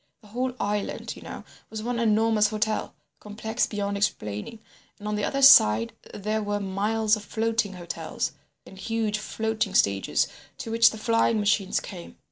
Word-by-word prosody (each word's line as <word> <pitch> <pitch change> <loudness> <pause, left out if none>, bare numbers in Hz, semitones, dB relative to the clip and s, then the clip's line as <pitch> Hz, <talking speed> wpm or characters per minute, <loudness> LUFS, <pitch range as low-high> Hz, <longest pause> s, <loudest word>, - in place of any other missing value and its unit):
The 210 - -18
whole 250 +3 -2
island, 205 0 -3
you - - -12
know, - - -8 0.3
was 215 -1 -6
one 240 0 -2
enormous 220 -1 +3
hotel, 215 0 -2 0.2
complex 220 +2 -2
beyond 200 -1 -3
explaining, 105 - -2 0.4
and 210 - -8
on 210 - -1
the 210 - -2
other 275 +4 -1
side 115 - +7 0.2
there 215 +2 -2
were 205 0 -2
miles 210 +3 +1
of 210 - -8
floating 225 -2 -1
hotels, 175 -2 -4 0.3
and 190 - -13
huge 220 0 -1
floating 215 -2 -2
stages 100 -1 +2 0.3
to 225 - -6
which 230 0 +6
the 220 - -8
flying 230 0 +2
machines 205 -2 +1
came. 175 -3 -10
215 Hz, 160 wpm, -26 LUFS, 200-225 Hz, 0.4 s, side